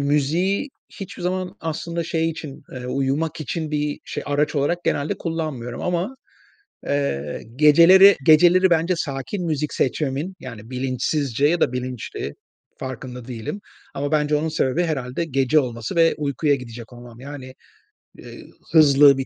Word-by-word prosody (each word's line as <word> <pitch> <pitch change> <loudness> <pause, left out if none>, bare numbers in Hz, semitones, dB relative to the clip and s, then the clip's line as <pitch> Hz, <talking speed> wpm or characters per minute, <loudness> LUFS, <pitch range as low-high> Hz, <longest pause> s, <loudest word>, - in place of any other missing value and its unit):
müziği 155 - +1 0.3
hiçbir 195 -1 -7
zaman 185 +2 -2
aslında 165 +1 -3
şey 165 0 0
için, 150 -3 -8
eee, 125 -1 -6
uyumak 140 +5 -1
için 155 0 -3
bir 150 -1 -1 0.3
araç 145 +2 0
olarak 165 +5 0
genelde 145 +1 0
kullanmıyorum 155 -8 -4
ama, 180 +8 -2 0.7
eee, 75 - -2
geceleri, 170 +7 +8
geceleri 175 +4 +6
bence 170 +2 +2
sakin 160 +6 -3
müzik 150 -2 -1
seçmemin, 145 +6 -1
yani, 115 -3 -9
bilinçsizce 130 +1 0
ya 170 +3 +2
da - - +2
bilinçli, 125 - -5 0.5
farkında 125 -1 -7
değilim 120 - -5 0.3
ama 145 +2 -3
bence 150 -1 +2
onun 155 +2 -1
sebebi 155 0 0
herhâlde 140 -1 -2
gece 135 0 +2
olması 120 -1 -5
ve 165 -1 +4
uykuya 145 0 +1
gidecek 120 -3 -8
olmam. 120 -1 -12
Yani, 130 -1 -9 0.6
eee, - - -11 0.3
hızlı 145 -3 +7
bir 135 - -2
145 Hz, 135 wpm, -22 LUFS, 130-165 Hz, 0.7 s, geceleri